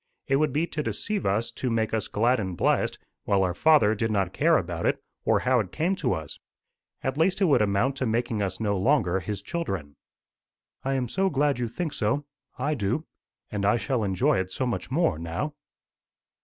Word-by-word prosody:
It 135 - +2
would 150 0 +2
be 150 +5 +1
to 155 -2 -4
deceive 205 +6 -2
us 110 +4 0
to 125 +2 -3
make 110 -1 0
us 110 -2 0
glad 120 +4 +2
and 95 -4 -3
blessed, - - +1 0.3
while 100 -1 +3
our 90 -1 0
Father 150 - +5
did 110 +1 -1
not 95 -4 0
care 165 +2 +4
about 85 -1 -2
it, - - +1 0.3
or - - +3
how 130 -1 +3
it 95 -5 -3
came 175 +5 0
to 130 -8 0
us. 80 -2 -6 0.6
At 130 +3 -2
least 180 +4 +3
it 195 - +4
would 150 -9 +4
amount 105 +7 +1
to 130 - -1
making 115 -1 0
us 95 -2 -2
no 100 -3 0
longer 95 -5 +2
his 105 +2 -4
children." 95 - -4 0.9
"I 135 +1 0
am 130 -2 0
so 190 +9 +1
glad 145 -3 +1
you 120 - 0
think 155 +6 -4
so. 120 +7 0 0.3
I 140 +4 0
do. 120 +5 -1 0.5
And 105 -1 -2
I 105 +4 +4
shall 120 -1 -1
enjoy 95 -1 +2
it 95 0 -2
so 130 - -2
much 120 - -3
more 135 - +1
now." 85 - -3
115 Hz, 205 wpm, -26 LUFS, 100-145 Hz, 0.9 s, Father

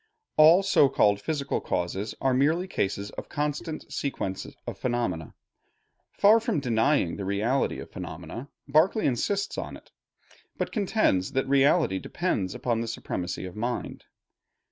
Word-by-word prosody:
All 160 +5 +7
so 150 -8 +4
called 100 -6 +3
physical 145 +3 -2
causes 95 +4 -2
are 135 -1 +2
merely 155 +8 +2
cases 100 - -2
of - - -8
constant 150 +2 -3
sequence 95 -9 -3 0.2
of - - -6
phenomena. 120 -11 -2 0.8
Far 215 +3 +6
from 225 - -1
denying 120 - +1
the 100 - -4
reality 105 +8 0
of - - -9
phenomena, 130 +4 -7 0.2
Berkeley 160 +10 +3
insists 200 - 0
upon - - -5
it; - - -22 0.7
but - - -2
contends 200 - +1
that 135 0 0
reality 140 - +3
depends 105 - -2
upon 115 -2 -1
the 115 - -3
supremacy 90 -5 -4
of 90 - -8
mind. 120 +3 -4
135 Hz, 140 wpm, -27 LUFS, 100-155 Hz, 0.8 s, All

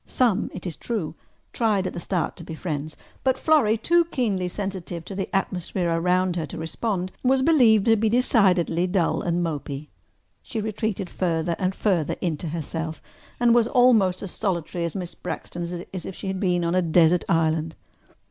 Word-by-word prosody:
Some, 225 -5 +2
it 180 - -8
is 170 -4 -4
true, 210 -11 -3 0.4
tried 210 -5 +1
at - - -3
the - - -5
start 175 0 -1
to - - -9
be 160 - -7
friends, 155 -2 -4 0.3
but 260 -1 +2
Florrie, 270 -9 +3
too 340 +9 +3
keenly 215 - -1
sensitive 185 -3 -5
to - - -7
the 195 0 -3
atmosphere 180 -2 -1
around 180 +2 +1
her 160 -3 -2
to - - -8
respond, 185 +3 -2
was 260 +1 +3
believed 240 -10 +5
to 225 - +5
be 220 0 +1
decidedly 185 -8 +3
dull 180 -2 +1
and 175 0 0
mopy. 150 -2 -4 0.5
She 225 - -5
retreated 215 -2 -2
further 170 -2 -1
and 190 0 0
further 180 -8 +1
into 170 -1 -2
herself 160 0 -4 0.4
and 240 -1 +5
was 235 -1 +4
almost 225 -9 +4
as 195 - -5
solitary 175 -4 -2
at 170 - -4
Miss 180 -3 -4
Braxton's 175 0 -5 0.2
as 185 - -5
if 190 - -6
she - - -7
had 190 -1 -2
been 180 -3 +1
on 170 - 0
a 185 - +3
desert 170 0 +4
island. 160 -1 +1
185 Hz, 180 wpm, -24 LUFS, 170-215 Hz, 0.5 s, believed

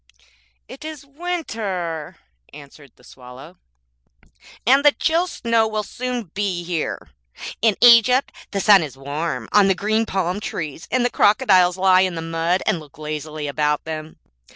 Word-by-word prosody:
'It - - -11
is 310 -3 -8
winter,' 225 - -5 0.4
answered 145 -1 -14
the - - -24
Swallow, 130 +8 -14 1.1
and 270 +5 +4
the 290 -1 +6
chill 335 +3 0
snow 230 -8 0
will 215 -1 -3
soon 245 -3 -5
be 195 -4 -2
here. 170 -2 -4 0.5
In 220 -3 +3
Egypt 245 +2 +6 0.2
the 200 - -3
sun 200 -1 +6
is 145 -4 -7
warm 145 +4 -4
on 205 -2 +5
the 195 - +2
green 220 +4 0
palm 185 0 -2
trees, 160 -6 -6
and 255 -1 +1
the 245 - 0
crocodiles 190 -6 +3
lie 185 0 +4
in 185 -2 0
the 165 - -4
mud 165 +2 -1
and 170 - +1
look 150 -3 -16
lazily 155 0 -6
about 150 +1 -1
them. 155 0 -7
185 Hz, 150 wpm, -21 LUFS, 155-230 Hz, 1.1 s, the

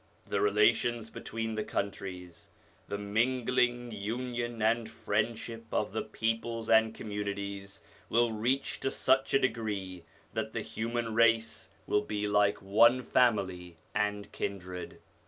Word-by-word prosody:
The 100 - -1
relations 110 +2 +3
between 115 0 -4
the 110 0 -1
countries, 90 -4 -5 0.4
the 100 - -3
mingling, 120 +3 +1
union, 120 +2 -3
and 110 +1 +2
friend 105 +2 -1
ship 115 0 -8
of 105 - 0
the 110 - -1
peoples 115 0 -2
and 110 0 +6
communities, 100 -1 -5 0.3
will 120 0 +3
reach 120 +5 0
to 135 - 0
such 135 0 +2
a - - +6
degree 100 -8 -2 0.3
that - - -3
the - - -2
human 115 0 -3
race 115 0 +2 0.2
will 105 - +2
be 105 0 -2
like 105 -1 +2
one 115 +6 +5
family 95 -10 +1 0.2
and 105 -1 -1
kindred. 90 -2 -5
110 Hz, 130 wpm, -31 LUFS, 100-115 Hz, 0.4 s, and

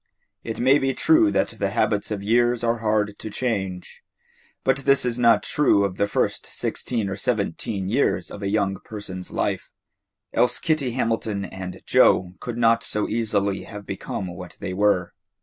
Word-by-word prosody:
It 115 - -5
may 135 +3 +5
be 135 0 0
true 320 0 +4
that - - +1
the 100 - +1
habits 105 -1 0
of 105 -2 -3
years 120 +2 +2
are 115 0 +1
hard 105 -2 0
to 110 - -6
change, 95 -6 -3 0.6
but 130 0 +2
this 135 -1 +3
is 125 0 -1
not 115 -1 +5
true 140 -9 +3
of 95 -1 -4
the 100 - +2
first - - -1
sixteen 115 -5 -2
or 95 - -3
seventeen 100 -2 -2
years 125 +8 0
of 105 - -8
a 100 - -1
young 100 -2 0
person's 95 -4 -7
life, - - -2 0.6
else 125 - +3
Kitty 155 -7 0
Hamilton 115 -4 -1
and 95 -1 -8
Joe 90 -1 +4
could 120 -1 -5
not 115 -1 +3
so 105 - -2
easily 105 -3 0
have 105 -1 -9
become 100 0 -4
what 90 0 -9
they 90 - -4
were. 95 -3 +1
105 Hz, 170 wpm, -24 LUFS, 100-120 Hz, 0.6 s, may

